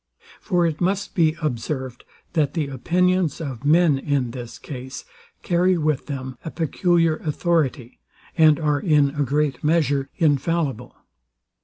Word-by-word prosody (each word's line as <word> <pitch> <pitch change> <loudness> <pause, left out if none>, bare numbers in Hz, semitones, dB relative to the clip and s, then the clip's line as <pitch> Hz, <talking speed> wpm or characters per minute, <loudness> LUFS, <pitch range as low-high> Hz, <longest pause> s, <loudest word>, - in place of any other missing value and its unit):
For 175 -1 +1
it 160 -1 -2
must 195 +3 -1
be 160 -5 +2
observed, 130 -2 -3 0.3
that 155 -3 0
the 150 -4 -1
opinions 175 +4 +1
of 135 -6 -6
men, 155 -1 +4
in 135 -4 -1
this 120 -1 -8
case, 130 -2 -8 0.4
carry 180 0 +2
with 155 -4 -1
them 130 -3 -6
a - - -5
peculiar 165 0 +1
authority, 150 -6 -1 0.4
and 155 -3 +5
are, 150 -2 +1
in 145 -3 +3
a 145 0 -3
great 145 -1 0
measure, 145 -3 +1
infallible. 145 -4 0
150 Hz, 135 wpm, -22 LUFS, 135-170 Hz, 0.4 s, and